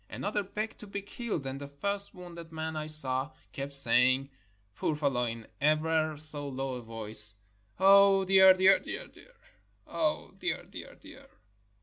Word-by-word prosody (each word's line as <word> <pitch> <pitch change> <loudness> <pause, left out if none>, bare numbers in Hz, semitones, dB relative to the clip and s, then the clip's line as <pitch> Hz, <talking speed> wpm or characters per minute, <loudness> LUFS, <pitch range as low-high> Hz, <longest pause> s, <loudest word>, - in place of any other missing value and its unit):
Another 205 0 -3
begged 210 +3 -6
to 210 - -11
be 200 0 -6
killed, 205 - -5
and 135 +1 -6
the 140 - -7
first 200 +9 0
wounded 170 -2 -11
man 160 0 -5
I 155 0 -5
saw 135 -3 +5 0.2
kept 140 +1 -6
saying, 130 +1 +3 0.4
poor 155 - -2
fellow, 140 -5 -1
in 115 -1 -6 0.2
ever 155 +1 0
so 145 -1 -7
low 135 0 -4
a 125 - -6
voice, 110 -2 -1 0.2
" 100 +5 -38
Oh, 195 0 +5
dear, 190 0 +7
dear, 190 +1 +4
dear! - - -6 0.8
Oh, 310 -1 -2
dear, - - -3
dear, - - -11
dear!" 275 +1 -16
155 Hz, 155 wpm, -29 LUFS, 135-190 Hz, 0.8 s, dear